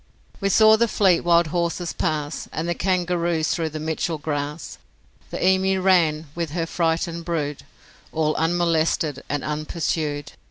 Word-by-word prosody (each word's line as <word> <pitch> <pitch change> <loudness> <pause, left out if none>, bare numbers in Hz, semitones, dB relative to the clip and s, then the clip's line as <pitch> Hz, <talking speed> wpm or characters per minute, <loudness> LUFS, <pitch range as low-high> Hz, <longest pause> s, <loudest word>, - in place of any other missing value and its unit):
We 195 - 0
saw 220 +2 +6
the 235 +1 +3
fleet 190 -5 +3
wild 170 0 +4
horses 170 0 -1
pass, 150 -1 -2
And 160 +2 -3
the 175 - +1
kangaroos 175 -3 0
through 165 -2 -1
the 155 0 -6
Mitchell 160 +1 -2
grass, 145 +1 -4 0.5
The - - -2
emu 190 0 +3
ran 170 -5 +3
with 170 -1 -3
her 165 -1 -1
frightened 165 0 -1
brood 150 -5 -3 0.5
All 155 -1 +1
unmolested 165 -3 +1
and 145 -1 -2
unpursued. 150 -1 -2
165 Hz, 145 wpm, -23 LUFS, 155-175 Hz, 0.5 s, saw